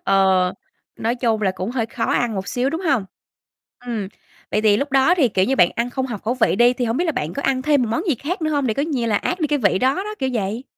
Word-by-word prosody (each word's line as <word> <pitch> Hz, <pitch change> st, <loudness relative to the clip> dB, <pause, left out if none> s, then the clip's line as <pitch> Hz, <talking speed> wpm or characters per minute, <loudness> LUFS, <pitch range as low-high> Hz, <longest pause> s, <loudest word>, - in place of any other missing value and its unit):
Ờ, 190 Hz, -2 st, +3 dB, 0.4 s
nói 230 Hz, +2 st, -1 dB
chung 230 Hz, -3 st, 0 dB
là 190 Hz, -, +2 dB
cũng 185 Hz, +3 st, -4 dB
hơi 240 Hz, -3 st, -1 dB
khó 230 Hz, 0 st, -3 dB
ăn 240 Hz, -3 st, 0 dB
một 190 Hz, 0 st, -4 dB
xíu, 255 Hz, +2 st, 0 dB
đúng 325 Hz, +3 st, -3 dB
hông? 275 Hz, -, +1 dB, 0.8 s
Ừm, 220 Hz, -5 st, -3 dB, 0.4 s
vậy -, -, +1 dB
thì 210 Hz, -2 st, +4 dB
lúc 280 Hz, +3 st, -3 dB
đó 270 Hz, +6 st, +4 dB
thì, 280 Hz, -9 st, +3 dB
kiểu 190 Hz, -2 st, +1 dB
như, 270 Hz, +5 st, 0 dB
bạn 175 Hz, -, +5 dB
ăn 235 Hz, +1 st, -1 dB
không 260 Hz, +1 st, -2 dB
hợp 235 Hz, -6 st, -6 dB
khẩu 235 Hz, +3 st, -1 dB
vị 225 Hz, -6 st, +2 dB
đi, 240 Hz, +1 st, +5 dB
thì 245 Hz, 0 st, -2 dB
hông 230 Hz, +2 st, -1 dB
biết 350 Hz, -, +1 dB
là 320 Hz, -, 0 dB
bạn 155 Hz, -, -3 dB
có 280 Hz, -, -4 dB
ăn 260 Hz, -1 st, 0 dB
thêm 290 Hz, -2 st, +3 dB
một 235 Hz, -, -1 dB
món 230 Hz, -, 0 dB
gì 305 Hz, -, +3 dB
khác 320 Hz, -, -4 dB
nữa 310 Hz, -, 0 dB
hông 285 Hz, -3 st, 0 dB
để 220 Hz, -, 0 dB
coi 280 Hz, -, 0 dB
như 265 Hz, -7 st, -2 dB
là 210 Hz, -2 st, +1 dB
át 360 Hz, -, -2 dB
đi 310 Hz, -, +2 dB
cái 295 Hz, -1 st, 0 dB
vị 200 Hz, -5 st, +2 dB
đó 260 Hz, +2 st, +2 dB
đó, 420 Hz, +3 st, -4 dB
kiểu 265 Hz, -1 st, -1 dB
vậy? 220 Hz, +2 st, -2 dB
245 Hz, 295 wpm, -21 LUFS, 215-280 Hz, 0.8 s, bạn